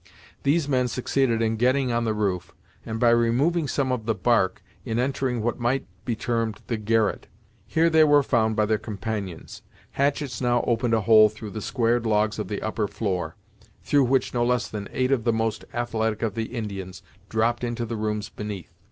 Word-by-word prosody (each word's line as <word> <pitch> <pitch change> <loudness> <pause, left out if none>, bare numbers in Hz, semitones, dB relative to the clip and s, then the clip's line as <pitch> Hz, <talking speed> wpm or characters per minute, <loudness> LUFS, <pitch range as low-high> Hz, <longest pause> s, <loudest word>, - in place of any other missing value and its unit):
These 145 +1 +2
men 130 -3 +2
succeeded 125 -1 0
in 110 0 0
getting 130 +2 +2
on 120 0 0
the 110 -1 0
roof, 95 -4 -2 0.3
and 110 0 -3
by 120 -1 +5
removing 130 +8 +2
some 135 -1 0
of 115 -3 -3
the 115 - +1
bark, 95 -3 +1 0.2
in 110 +2 -2
entering 125 -2 -1
what 120 +2 -1
might 120 +3 0 0.2
be 120 - -1
termed 115 -2 -2
the 115 - -2
garret. 110 0 0 0.4
Here 165 +1 +3
they 160 -1 +5
were 145 -1 +5
found 110 -4 +1
by 105 -1 +2
their 110 0 +1
companions. 105 -4 -5 0.3
Hatchets 140 -2 -1
now 120 -1 +2
opened 115 -1 +1
a 110 - +1
hole 110 +1 +7
through 110 0 -9
the 110 - -5
squared 120 +1 0
logs 110 0 +1
of 105 - -3
the 105 - -4
upper 110 -1 -1
floor, 95 -6 -3 0.5
through 145 -2 +3
which 130 +1 +1
no 120 -1 +1
less 125 0 +1
than 105 -2 -6
eight 130 0 0
of 130 -5 +2
the 120 - +2
most 110 -1 -1
athletic 115 -3 -1
of 110 - 0
the 115 -1 -2
Indians 100 -6 -6 0.3
dropped 115 +2 +1
into 120 -1 -2
the 115 0 -4
rooms 105 -1 -2
beneath. 105 -4 -7
115 Hz, 195 wpm, -25 LUFS, 110-125 Hz, 0.5 s, hole